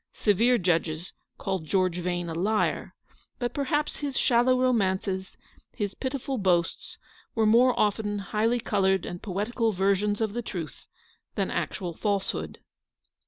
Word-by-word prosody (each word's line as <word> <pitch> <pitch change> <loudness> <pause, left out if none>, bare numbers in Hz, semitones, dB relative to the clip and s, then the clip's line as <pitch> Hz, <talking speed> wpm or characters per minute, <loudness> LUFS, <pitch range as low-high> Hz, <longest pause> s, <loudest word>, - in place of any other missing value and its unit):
Severe 230 +4 +3
judges 170 -2 0 0.2
called 190 -5 -3
George 185 0 +1
Vane 175 0 -2
a 165 - -4
liar; 205 +6 0 0.4
but 245 -2 -2
perhaps 295 +2 -1
his 285 -2 -3
shallow 250 +1 +4
romances, 190 -6 0 0.4
his 205 -4 -2
pitiful 265 -1 -3
boasts, 175 -3 0 0.4
were 225 -1 +3
more 240 +4 +5
often 210 0 +1
highly 215 +4 0
coloured 190 -5 +1
and 175 - -6
poetical 220 +3 -1
versions 200 +2 +1
of 220 -2 -1
the 240 - -2
truth, 170 - -7 0.5
than - - -1
actual 175 -3 -3
false 200 +2 0
hood. 80 -1 -6
205 Hz, 135 wpm, -27 LUFS, 185-235 Hz, 0.5 s, more